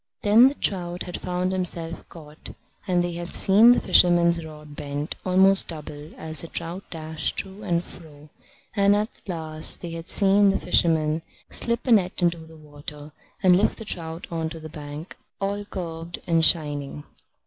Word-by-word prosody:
Then 220 +5 +7
the 275 - -1
trout 175 -6 -2
had 180 - -7
found 180 0 -2
himself 170 -3 -1
caught, 155 -2 -12 0.3
and 180 -2 +2
they 175 - -2
had 170 0 -5
seen 215 +5 +6
the 245 - +4
fisherman's 170 -2 +4
rod 150 -2 -11
bent 145 +1 -4
almost 190 +1 +5
double 150 -1 -7
as 155 -2 -4
the 165 - -8
trout 170 +4 -6
dashed 160 -1 -4
to 195 +1 -5
and 175 -4 -1
fro; 150 -4 -14 0.5
and 200 -1 +4
at 210 +2 -3
last 160 -3 -1
they 175 - -6
had 165 0 -7
seen 200 0 +4
the 195 - +1
fisherman 160 -3 +2 0.3
slip 235 0 -1
a 255 - 0
net 190 -5 +3
into 170 -1 +1
the 160 0 -14
water, 150 0 -11 0.3
and 180 -1 +6
lift 195 - +1
the 225 - -7
trout 165 -3 -5
on 165 -1 -2
to 165 0 -8
the 155 0 -9
bank, 150 +1 -9 0.2
all 200 +1 -2
curved 170 -3 -6
and 165 -1 +2
shining. 145 -3 0
170 Hz, 170 wpm, -24 LUFS, 155-190 Hz, 0.5 s, Then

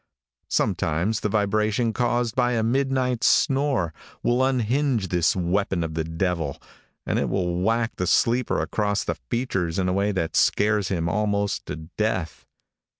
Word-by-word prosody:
Sometimes 90 +8 0
the 105 - -1
vibration 110 +2 +1
caused 120 -1 0
by 125 -1 +2
a 115 -2 +1
midnight 130 0 0
snore, 135 - +2 0.3
will 120 +2 +2
unhinge 130 -4 +1
this 85 -2 +2
weapon 95 0 0
of 80 -1 -4
the 80 0 -1
devil, 80 -3 -2 0.5
and - - 0
it - - -1
will 90 -2 -1
whack 115 +3 0
the 90 - -1
sleeper 120 +5 +2
across 105 -1 -1
the - - -3
features 100 -9 -1
in 95 -1 +1
a 90 - +1
way 100 +2 +1
that 95 -5 -2
scares 105 -2 +2
him 85 -3 -1
almost 100 +2 -1
to - - -4
death. 85 +1 -3
105 Hz, 150 wpm, -24 LUFS, 90-120 Hz, 0.5 s, by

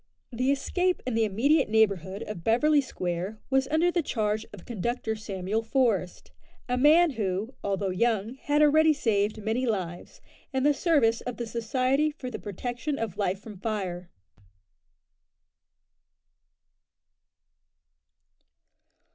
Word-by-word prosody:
The 255 +2 0
escape 360 +6 0
in 255 - -2
the 225 0 +2
immediate 265 +8 +2
neighbourhood 200 -3 +1
of 195 -6 -7
Beverly 290 - +4
Square 185 -4 -4
was 265 0 +2
under 320 +4 +2
the 345 - +1
charge 215 -6 -1
of 200 -4 -12
Conductor 235 0 -2
Samuel 205 0 -3
Forest, 225 -6 0 0.4
a 250 - 0
man 310 +6 +5
who, 210 0 -2
although 195 -1 -1
young, 220 +2 0
had 290 +3 +1
already 310 +1 +5
saved 215 -4 0
many 230 +4 0
lives, 180 -6 -4 0.3
in 265 -1 0
the 295 +1 +4
service 275 -8 +2
of 250 - -5
the 235 - -3
Society 255 +6 0
for 275 -4 -7
the - - -5
Protection 245 - -4
of 220 -5 -3
Life 195 -2 -1
from 210 -3 -11
Fire. 185 -5 -3
225 Hz, 125 wpm, -27 LUFS, 205-270 Hz, 0.4 s, man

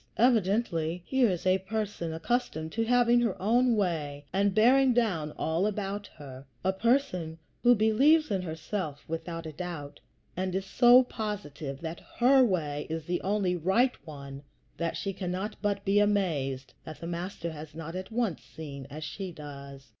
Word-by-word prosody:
Evidently, 195 -7 +2
here 260 -4 +3
is 180 -2 -3
a 185 +1 +4
person 200 -4 -3
accustomed 160 -3 -2
to 225 - 0
having 240 0 +4
her 225 -6 -1
own 235 +4 +3
way 150 -8 -1
and 195 0 +2
bearing 255 +3 +5
down 180 -11 +1
all 165 +5 0
about 205 -1 -3
her; 135 -2 -10 0.2
a 190 +1 +2
person 190 - 0 0.2
who 245 0 +6
believes 265 +8 +4
in 195 -2 +1
herself 160 -2 -5
without 165 +1 -5
a 160 - -5
doubt, 150 -4 -6 0.4
and 185 0 -2
is 190 0 -1
so 245 +4 +6
positive 160 - -5
that 165 +1 -5 0.2
her 260 +2 +6
way 155 -9 -1
is 160 -1 -4
the 175 +1 -1
only 195 -2 +1
right 190 +10 +2
one 140 -3 -9 0.4
that 170 0 -2
she 195 - -3
cannot 190 +3 -3
but 200 -1 -1
be 200 +1 +4
amazed 160 -11 0
that 155 -2 -9
the - - -7
Master 170 0 -4
has 155 0 -9
not 165 +1 -6
at 185 0 -5
once 225 -6 -1
seen 140 -4 -9
as 155 +2 -7
she 185 +4 -5
does. 140 -3 -10
185 Hz, 165 wpm, -29 LUFS, 160-215 Hz, 0.4 s, who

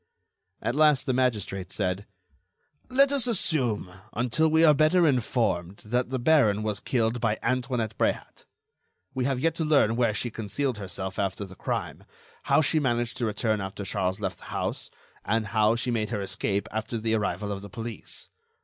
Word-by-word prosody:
At 120 +3 0
last, 150 -2 +4
the 130 - +1
magistrate 105 -7 -1
said: 95 +1 -2 0.8
"Let 275 +2 +4
us 275 -3 +3
assume, 130 - +1 0.2
until 125 +7 +1
we 160 +1 +5
are 150 - +7
better 155 +4 +4
informed, 115 - 0
that 125 +3 0
the 130 - -1
baron 120 -7 +3
was 105 -2 -1
killed 115 0 0
by 110 -2 +1
Antoinette 125 -3 -1
Bréhat. - - -1 0.7
We 130 -1 -1
have 135 -2 0
yet 165 +4 +1
to 160 - -2
learn 145 -8 +3
where 115 -3 +1
she 120 - -2
concealed 115 +3 -2
herself 95 0 -5
after 100 0 -1
the 95 - -12
crime, - - -4 0.4
how - - +4
she 155 +1 +2
managed 120 -4 0
to 120 -3 0
return 110 0 0
after 95 +1 -5
Charles 95 0 -1
left 95 -4 -3
the - - -14
house, - - -3 0.3
and 110 +2 0
how 110 +2 +2
she 120 +1 -1
made 110 -3 -1
her 105 -3 -2
escape 100 +1 -2
after 110 +2 -3
the 110 0 -1
arrival 105 -1 -1
of 100 -1 -4
the 100 - -9
police. 115 +3 -7
115 Hz, 175 wpm, -27 LUFS, 105-130 Hz, 0.8 s, are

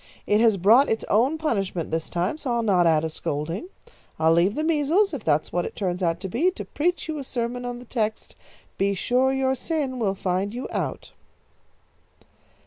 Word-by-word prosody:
"It 210 +1 +3
has 225 -3 +4
brought 225 +10 +5
its 220 - -1
own 255 +9 +3
punishment 195 - -2
this 160 0 -2
time, 180 - -1
so 265 - -3
I'll 235 -1 0
not 185 -5 +3
add 160 -1 +3
a - - +1
scolding. 155 - -4 0.5
I'll 160 +1 +4
leave 180 +6 +3
the 305 - -1
measles, 330 +5 +2
if 265 -7 -4
that's 155 -1 0
what 175 0 +1
it - - -6
turns 180 -2 -2
out 170 -1 0
to 195 - -3
be, 265 - +2
to 370 - -7
preach 335 +1 -1
you 310 -2 -3
a - - -5
sermon 245 -1 -3
on 245 0 -4
the 245 - -11
text, 220 -3 -3 0.4
'Be 200 0 +2
sure 250 +7 +2
your 265 0 +1
sin 265 -1 -2
will 200 -4 0
find 190 +3 -2
you 250 - -4
out.'" - - -4
225 Hz, 200 wpm, -24 LUFS, 180-270 Hz, 0.5 s, brought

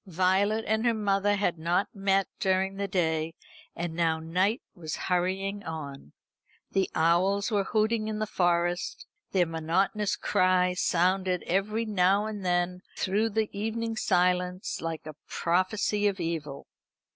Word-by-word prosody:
Violet 190 +5 +2
and 220 +1 +1
her 235 -2 +2
mother 205 -1 +1
had 185 -5 0
not 175 +4 +1
met 195 -1 +1
during 190 0 +1
the 200 0 -2
day, 160 -3 0 0.4
and 170 -1 -3
now 165 -1 +1
night 180 +8 0
was 160 -5 -5
hurrying 190 +3 -1
on. 140 - -7 0.6
The 195 -1 +1
owls 185 +6 +2
were 200 -2 +1
hooting 215 +1 +1
in 215 -1 -2
the 215 - -1
Forest. 175 -2 0 0.3
Their 185 -2 +3
monotonous 175 +6 0
cry 185 -2 +2
sounded 180 +1 +1
every 210 +5 0
now 200 0 +2
and 210 -2 -5
then 180 0 0 0.2
through 210 +4 +1
the 220 -1 -1
evening 225 +2 -2
silence 180 -2 0
like 165 -1 -4
a 155 - -7
prophesy 200 +4 +1
of 200 -1 -1
evil. 160 -5 -4
185 Hz, 140 wpm, -28 LUFS, 175-205 Hz, 0.6 s, Their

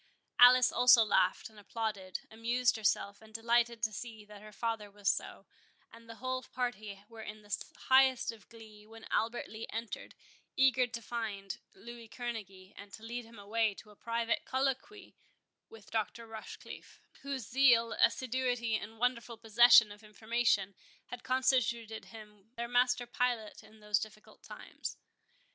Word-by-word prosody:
Alice 250 0 +8
also 245 -2 +7
laughed, 185 -3 +2
and 220 -1 -16
applauded, 205 -3 -4
amused 235 +2 +1
herself, 205 -1 0
and 220 0 -16
delighted 230 +1 +1
to 220 - +1
see 220 -1 -8
that 210 -1 -13
her 215 0 -12
father 225 -1 -3
was 200 0 -8
so; - - -1 0.5
and 230 0 -15
the 230 - -8
whole 255 +1 -3
party 215 -7 -5
were 225 0 -11
in 215 0 -9
the 205 -1 -2 0.3
highest 260 -2 +4 0.2
glee, 215 -2 -14
when 225 0 -13
Albert 230 +2 0
Lee 220 +1 -8
entered, 225 0 -6 0.4
eager 260 -1 +4
to 235 -1 -7
find 205 -4 -5 0.2
Louis 235 +3 -11
Kerneguy, 205 -5 -7
and 200 0 -12
to 220 - -10
lead 240 +1 -5
him 230 0 -15
away 210 +1 0
to 210 - -14
a - - -18
private 230 +1 -1
colloquy 270 +10 -3 0.6
with 220 -3 -15
Dr. 225 +1 -2
Rochecliffe, 220 -1 -10 0.2
whose 270 -5 -5
zeal, 240 -3 +4
assiduity, 245 -3 +1
and 220 +1 -9
wonderful 235 -1 -1
possession 230 0 +6
of 205 +1 -12
information, 215 -2 0 0.4
had 245 0 -8
constituted 235 -4 0
him 210 -2 -14
their 235 0 -3
master 245 0 +2
pilot 240 -3 -2
in 215 0 -18
those 210 0 +1
difficult 215 0 -10
times. - - -8
225 Hz, 150 wpm, -32 LUFS, 215-245 Hz, 0.6 s, Alice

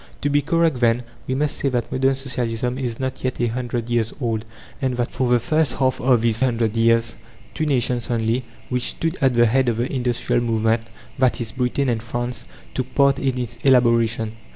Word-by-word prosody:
To 145 - 0
be 145 0 +3
correct, 165 -4 +1
then, 120 0 +2 0.2
we 130 - -1
must 150 +2 0
say 140 - 0
that 125 -2 -2
modern 135 +1 +2
Socialism 125 -2 -2
is 120 -4 -3
not 130 0 -4
yet 130 -1 -2
a 120 - +2
hundred 120 0 -3
years 120 -2 0
old, 115 -4 -2 0.4
and 130 -2 -1
that, 120 -1 -1
for 130 -1 -1
the 120 - +5
first 155 +2 +1
half 130 -1 0
of 125 -3 +3
these 115 -2 +3
hundred 115 -3 0
years, 115 0 +3 0.4
two 155 - -2
nations 125 -3 +1
only, 115 +1 0 0.3
which 125 -1 0
stood 165 +6 0
at 130 -2 +3
the 120 0 +5
head 125 +2 +2
of 115 - -1
the 120 +4 -2
industrial 120 -2 0
movement, 115 -1 +1 0.4
i.e., 125 -1 +2
Britain 125 +2 0
and 115 -3 0
France, 120 +1 -4 0.3
took 130 -1 -4
part 140 -1 +4
in 130 -2 -1
its 125 -3 -4
elaboration. 115 -4 +3
125 Hz, 200 wpm, -22 LUFS, 115-130 Hz, 0.4 s, the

